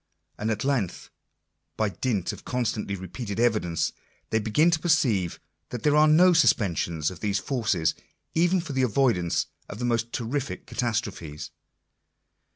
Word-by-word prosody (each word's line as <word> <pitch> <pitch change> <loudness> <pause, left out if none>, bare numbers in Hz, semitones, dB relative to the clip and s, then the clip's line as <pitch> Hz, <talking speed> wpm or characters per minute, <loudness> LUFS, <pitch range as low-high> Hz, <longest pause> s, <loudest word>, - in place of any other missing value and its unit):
And 110 - -1
at 110 -1 -1
length, 130 -10 -1 0.7
by 110 -1 +1
dint 105 -2 -1
of - - -11
constantly 110 -5 -2
repeated 100 +3 -6
evidence, 105 -9 +1 0.4
they 110 - +3
begin 115 +11 +3
to 160 - +2
perceive 120 - +1 0.3
that 120 - -6
there 150 -1 +4
are 155 +1 +6
no 175 +4 +6
suspensions 85 - +2
of 90 - -10
these 100 -2 0
forces 105 - 0 0.4
even 175 +2 +3
for 160 -4 -6
the 130 - +1
avoidance 115 -8 +2 0.2
of - - -7
the 120 - -3
most 115 -1 0
terrific 130 +4 -3
catastrophes. 105 - -3
115 Hz, 145 wpm, -26 LUFS, 100-140 Hz, 0.7 s, are